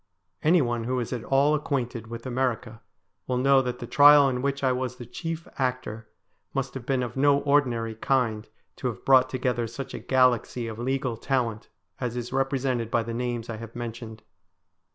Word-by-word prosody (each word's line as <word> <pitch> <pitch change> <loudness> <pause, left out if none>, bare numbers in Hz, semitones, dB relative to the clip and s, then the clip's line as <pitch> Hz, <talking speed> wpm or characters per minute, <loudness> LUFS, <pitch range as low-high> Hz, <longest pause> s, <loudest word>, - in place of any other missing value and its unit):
Anyone 125 -9 +2
who 130 +1 -1
is 120 - -3
at 120 -3 -4
all 140 +4 +3
acquainted 125 -6 -2
with 115 +1 -8
America 120 -3 -2 0.5
will 125 - 0
know 135 +1 +5
that 125 -1 -3
the 120 - -6
trial 145 +2 +7
in 125 -2 -1
which 140 +1 -1
T 130 -1 +2
was 125 -1 -2
the 125 - -9
chief 165 +5 -5
actor 125 -4 -2 0.5
must 135 -1 -2
have 130 -3 -8
been 130 -2 +1
of 120 - -5
no 140 +1 +4
ordinary 125 -6 +1
kind 115 -2 0 0.3
to 130 - -2
have 115 -6 -6
brought 130 -1 +6
together 125 -2 -1
such 120 +4 -7
a - - -5
galaxy 125 -2 +2
of 110 0 -7
legal 130 -1 -1
talent 115 -4 -2 0.3
as 125 -2 -3
is 120 +1 -5
represented 135 -3 0
by 115 0 +1
the 115 +1 -5
names 120 -1 -3
I 115 - -5
have 115 0 -10
mentioned. 115 -2 -7
125 Hz, 185 wpm, -26 LUFS, 115-135 Hz, 0.5 s, trial